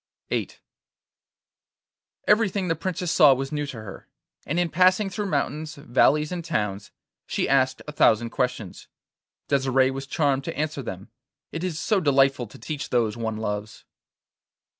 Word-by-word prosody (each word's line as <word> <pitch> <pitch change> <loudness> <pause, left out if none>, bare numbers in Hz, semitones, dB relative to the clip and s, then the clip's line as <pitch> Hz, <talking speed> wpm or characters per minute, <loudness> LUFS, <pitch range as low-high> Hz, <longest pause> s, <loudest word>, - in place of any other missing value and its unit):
VIII - - -1 1.8
Everything 210 -3 +3
the 165 - +2
Princess 180 0 -3
saw 150 -6 +7
was 135 +1 -4
new 150 -1 -2
to 135 -4 -7
her, 100 - -10 0.4
and 170 - 0
in 175 - +2
passing 185 +3 +3
through 205 +2 -3
mountains, 155 0 -2
valleys, 150 +3 +2
and 175 -2 -4
towns, 105 - -2 0.4
she - - -1
asked 130 -1 +2
a - - -4
thousand 115 -5 +3
questions. 125 -7 -3 0.6
Desire 135 -1 +2
was 135 +1 -6
charmed 140 -3 +1
to 165 - -5
answer 150 -1 -2
them. 100 -2 -8 0.4
It 165 - -5
is 180 -4 -2
so 210 +4 +1
delightful 135 -5 +3
to 105 - -14
teach 145 +5 -5
those 115 -3 +1
one 110 -2 -3
loves! 105 -1 -5
140 Hz, 150 wpm, -25 LUFS, 120-165 Hz, 1.8 s, saw